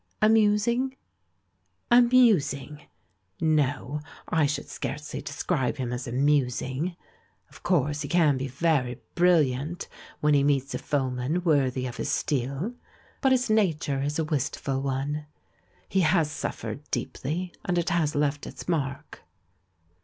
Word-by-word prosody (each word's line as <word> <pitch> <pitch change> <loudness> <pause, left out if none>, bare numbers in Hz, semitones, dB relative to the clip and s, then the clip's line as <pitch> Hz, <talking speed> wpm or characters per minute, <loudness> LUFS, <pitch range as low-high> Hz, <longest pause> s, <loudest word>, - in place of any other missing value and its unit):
Amusing?'* 220 +4 +3 1.0
"Amusing? 205 - +4 0.5
No, 145 -2 +1 0.3
I 160 -3 +2
should 145 0 -3
scarcely 150 +2 -5
describe 145 -2 -1
him 125 -2 -3
as 125 +1 -4
'amusing.' 135 +4 0 0.6
Of - - -15
course 150 -4 +1
he 145 - -3
can 155 -3 +3
be 130 +1 -3
very 135 -3 0 0.2
bril 175 -2 +5
liant 140 +7 -4 0.3
when 150 0 +3
he 140 -1 +4
meets 140 -1 +1
a - - -2
foeman 135 +3 -1
worthy 135 -6 +2
of 125 - -5
his - - -3
steel, 140 - -1 0.5
but 270 - +3
his 250 -1 +3
nature 160 -10 +1
is 145 +2 -1
a 160 - +1
wistful 135 -2 -2
one. 140 +3 -2 0.6
He 195 - +1
has 160 -2 +3
suffered - - -4
deeply, 175 +6 -3
and 175 - 0
it 170 - 0
has 160 -3 +1
left 145 0 0
its - - -9
mark." 140 -5 -3
150 Hz, 130 wpm, -27 LUFS, 135-175 Hz, 1.0 s, bril